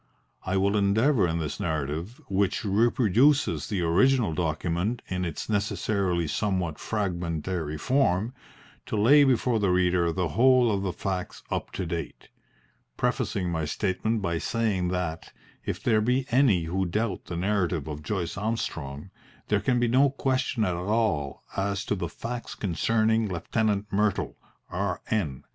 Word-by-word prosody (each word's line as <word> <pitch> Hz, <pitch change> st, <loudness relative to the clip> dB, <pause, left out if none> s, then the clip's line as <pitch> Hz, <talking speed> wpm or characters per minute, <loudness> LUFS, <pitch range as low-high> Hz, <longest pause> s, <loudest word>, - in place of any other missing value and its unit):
I 95 Hz, 0 st, -1 dB
will 100 Hz, +2 st, +2 dB
endeavour 105 Hz, +3 st, +3 dB
in 80 Hz, 0 st, -1 dB
this 80 Hz, +2 st, -3 dB
narrative, 80 Hz, -, -3 dB
which 100 Hz, +1 st, 0 dB
reproduces 120 Hz, +6 st, +3 dB
the 100 Hz, -4 st, -1 dB
original 105 Hz, +4 st, +3 dB
document 85 Hz, +7 st, -1 dB
in 90 Hz, 0 st, -2 dB
its 85 Hz, -4 st, -4 dB
necessarily 100 Hz, -4 st, 0 dB
somewhat 90 Hz, -3 st, -1 dB
fragmentary 85 Hz, -5 st, -2 dB
form, 115 Hz, -, +1 dB, 0.5 s
to -, -, -2 dB
lay 140 Hz, +8 st, +6 dB
before 125 Hz, -3 st, +2 dB
the 100 Hz, -2 st, +1 dB
reader 90 Hz, -1 st, +2 dB
the 90 Hz, -1 st, -1 dB
whole 125 Hz, -, +4 dB
of 100 Hz, -2 st, 0 dB
the 95 Hz, -2 st, -1 dB
facts 90 Hz, +1 st, -4 dB
up -, -, -2 dB
to 95 Hz, -, -3 dB
date, 85 Hz, -2 st, -5 dB, 0.7 s
prefacing 90 Hz, -2 st, -1 dB
my 80 Hz, -2 st, -1 dB
statement 105 Hz, +6 st, -1 dB
by 85 Hz, -2 st, 0 dB
saying 105 Hz, -5 st, 0 dB
that, 90 Hz, -3 st, -3 dB, 0.3 s
if -, -, -4 dB
there 110 Hz, -2 st, +3 dB
be 125 Hz, +4 st, +1 dB
any 120 Hz, -9 st, +4 dB
who 90 Hz, +3 st, -1 dB
doubt 105 Hz, +4 st, -2 dB
the 85 Hz, -, -5 dB
narrative 90 Hz, -5 st, 0 dB
of 75 Hz, -1 st, -5 dB
Joyce 85 Hz, +3 st, -3 dB
Armstrong, 95 Hz, -7 st, -3 dB, 0.4 s
there 105 Hz, -, +3 dB
can 125 Hz, -2 st, +1 dB
be 120 Hz, -, +2 dB
no 130 Hz, +4 st, +4 dB
question 130 Hz, -4 st, 0 dB
at 90 Hz, -, 0 dB
all 90 Hz, -6 st, -1 dB
as 100 Hz, +1 st, -1 dB
to -, -, 0 dB
the 100 Hz, -, -3 dB
facts 120 Hz, 0 st, -6 dB
concerning 110 Hz, +4 st, +1 dB
Lieutenant 105 Hz, +3 st, -1 dB
Myrtle, 105 Hz, 0 st, 0 dB, 0.3 s
R.N. 90 Hz, -, -2 dB
100 Hz, 145 wpm, -27 LUFS, 85-110 Hz, 0.7 s, lay